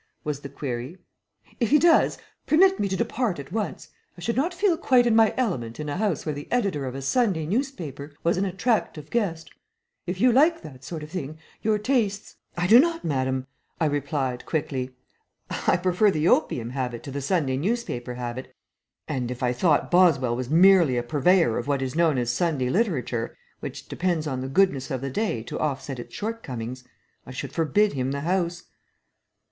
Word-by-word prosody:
was 150 -2 -3
the 140 - -8
query. 135 +3 -5 0.6
"If 235 -4 +1
he 300 - +6
does, 335 +2 +4 0.3
permit 380 +5 +5
me 200 - +1
to 190 - -2
depart 230 -3 -1
at 140 -1 -9
once. 215 -2 -3 0.3
I - - -11
should 230 +6 -1
not 290 +8 +1
feel 365 0 +2
quite 255 -6 +3
in 235 -2 +3
my 225 -1 +5
element 130 - -2
in 150 -1 -4
a 145 - -3
house 200 -6 -1
where 155 - -1
the 145 +1 -8
editor 195 - 0
of 130 - -5
a 135 - -5
Sunday 190 - +1
newspaper 175 - -3
was 170 - +2
an 185 - 0
attractive 190 - -1
guest. 175 -9 -1 0.6
If 180 +1 -3
you 250 +4 +5
like 320 +7 +4
that 130 -3 -11
sort 155 +2 -6
of 150 - -10
thing, 155 -4 -5 0.2
your 215 0 +2
tastes 210 -3 -1
" - - -34
"I 175 - 0
do 220 +7 +8
not, 330 +3 +2
madame," 130 -3 -1 0.3
I 165 - +2
replied, 140 -3 -1
quickly. 130 -5 -2 0.7
"I - - +5
prefer 185 +3 +3
the 155 -3 +1
opium 120 -8 +2
habit 125 -3 -3
to 140 - -7
the 140 +1 -4
Sunday 140 -3 0
newspaper 145 - -2
habit, 125 +1 -5 0.6
and 125 -2 -2
if 125 0 -5
I 125 0 +2
thought 150 +4 +2
Boswell 155 -10 +4
was 125 0 -4
merely 170 -4 +6
a 120 - 0
purveyor 145 -1 +3
of 120 - -6
what 140 -2 0
is 130 -1 -3
known 165 -4 +3
as 120 -1 0
Sunday 135 -2 0
literature, 140 - -1 0.2
which - - -7
depends 170 -3 -1
on 130 -4 -3
the 130 - -4
goodness 140 -4 +2
of 130 -2 -3
the 135 0 -3
day 165 - -1
to - - -6
offset 135 -3 -3
its - - -9
shortcomings, 130 - -5 0.4
I - - -9
should 130 - -6
forbid 175 +6 +2
him 130 -1 -1
the 140 - -3
house." 175 +1 -1
160 Hz, 195 wpm, -25 LUFS, 130-205 Hz, 0.7 s, do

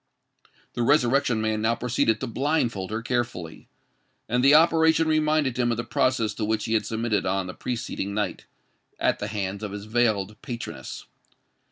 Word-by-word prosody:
The - - -3
Resurrection 125 -2 +3
Man 110 0 0
now 115 +1 +2
proceeded 115 -3 +1
to - - -1
blindfold 120 -7 -1
her 110 +2 -3
carefully; 120 -9 -3 0.6
and 125 +2 +1
the 140 +2 +7
operation 160 0 +4
reminded 155 -4 +1
him 120 -1 +2
of 115 - 0
the 120 - -2
process 120 -5 +1
to 110 - -4
which 110 0 -1
he 110 - -1
had 110 - +1
submitted 110 -4 -1
on 95 0 0
the 90 - -6
preceding 115 -5 -4
night, 105 - -3 0.5
at - - +1
the 105 - -3
hands 100 -1 -3
of 105 -2 -5
his 105 0 -6
veiled 110 -3 0
patroness. 85 - -7
115 Hz, 170 wpm, -25 LUFS, 105-125 Hz, 0.6 s, the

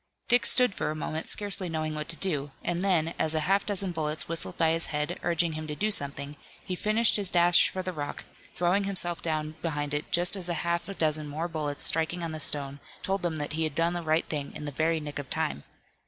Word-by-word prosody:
Dick 245 0 +5
stood 250 -5 +4
for - - -2
a 155 - -2
moment, 155 +1 -3
scarcely 200 -3 +1
knowing 155 -1 -2
what 150 +1 -5
to 170 - -1
do, 150 -6 -1
and 175 0 -1
then, 170 -4 +2
as 160 0 +1
a 155 - +1
half 195 +5 +2
dozen 195 -2 +1
bullets 155 -2 -2
whistled 165 0 -3
by 165 -1 +3
his 165 +1 0
head, 150 +4 -2
urging 170 -1 +1
him 155 0 -5
to 150 - -4
do 215 +6 0
something, 140 -3 0 0.3
he 185 - -3
finished 215 +5 +4
his 200 -3 +1
dash 175 -1 +5
for 185 - -4
the 185 0 -3
rock, 145 -3 -5 0.3
throwing 180 +4 +2
himself 180 -3 0
down 155 -1 -2
behind 145 -3 -2
it 145 +1 -3
just 175 +3 +4
as 180 -2 -1
a 175 - 0
half 170 +2 -1
a 195 - -5
dozen 155 -2 0
more 155 +4 -3
bullets 150 -3 -3
striking 165 +2 +2
on 165 - -3
the 155 - -5
stone 140 -1 0 0.2
told 195 -1 -1
him 170 -2 0
that 145 0 -3
he 160 +1 0
had 155 -3 -2
done 165 +1 +2
the 175 - -2
right 160 0 +1
thing 145 -2 -3
in 150 - -6
the 145 - -3
very 160 +3 +1
nick 145 -1 -6
of 140 - -7
time. 70 +2 -2
165 Hz, 245 wpm, -28 LUFS, 150-180 Hz, 0.3 s, Dick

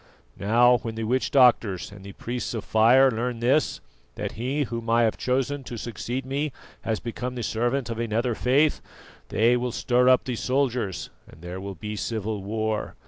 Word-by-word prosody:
Now 120 +4 +5
when 115 -1 -6
the 115 - -3
witch 125 +4 0
doctors 115 -9 +3
and 100 -1 -12
the 100 0 -9
priests 120 +2 -4
of 110 - -4
fire 125 +5 +5
learn 120 +1 -2
this, 125 - +1 0.3
that - - -4
he 130 +6 -1
whom 115 -3 -5
I 115 +1 +4
have 110 - +2
chosen 135 +2 -1
to 120 - -6
succeed 120 +3 -4
me 140 +3 -2 0.3
has 110 -1 -2
become 125 +2 -5
the 120 - -4
servant 120 +4 -1
of 115 - -4
another 115 +1 0
faith, 140 +7 +2 0.5
they 115 +3 +3
will 125 0 -1
stir 125 +2 +2
up 130 -1 +5
the 125 - -3
soldiers 125 -7 -1 0.2
and 80 - -16
there 90 +2 -6
will 100 0 -6
be 105 +6 -6
civil 105 +1 -3
war. 110 +1 -2
120 Hz, 185 wpm, -25 LUFS, 110-125 Hz, 0.5 s, Now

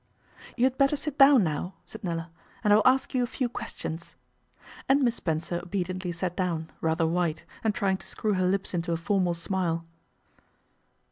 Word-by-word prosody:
'You 240 - +1
had 260 0 +2
better 275 +2 +4
sit 295 0 -5
down 275 -4 +8
now,' 165 +3 -2
said 220 - -10
Nella, 165 -2 -3 0.3
'and 210 -1 +5
I - - +8
will 215 - +4
ask 260 +1 +3
you 255 - +2
a 245 - +1
few 255 +1 -1
questions.' 170 -7 -6 0.7
And 275 +1 +5
Miss 240 -2 +3
Spencer 170 -3 -2
obediently 180 0 -3
sat 175 +1 -3
down, 170 -4 -2
rather 160 +1 +1
white, 165 -1 0 0.2
and 220 -1 +1
trying 195 -5 +1
to - - -7
screw 215 -1 -1
her 185 -1 +2
lips 195 +1 0
into 170 -1 -1
a - - 0
formal 180 0 +1
smile. 170 -1 -1
185 Hz, 185 wpm, -27 LUFS, 170-220 Hz, 0.7 s, down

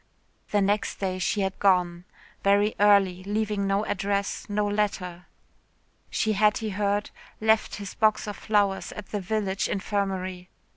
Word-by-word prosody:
The 205 - +2
next 205 +3 +1
day 185 -1 -2
she 200 +3 0
had 190 0 -2
gone 180 -3 +2 0.4
very 205 +2 +3
early, 200 -3 +4
leaving 205 0 -1
no 195 +2 +1
address, 200 +1 -2
no 205 0 0
letter. 195 -4 -2 0.8
She 220 - 0
had, 210 +1 +3
he 220 -1 -3
heard, 205 +1 -1 0.3
left 220 0 +2
his 200 -2 -7
box 215 -1 +2
of 210 -1 -5
flowers 200 -2 0
at 210 - -9
the 205 - -2
village 195 0 -1
infirmary. 190 -2 -2
200 Hz, 145 wpm, -26 LUFS, 190-210 Hz, 0.8 s, early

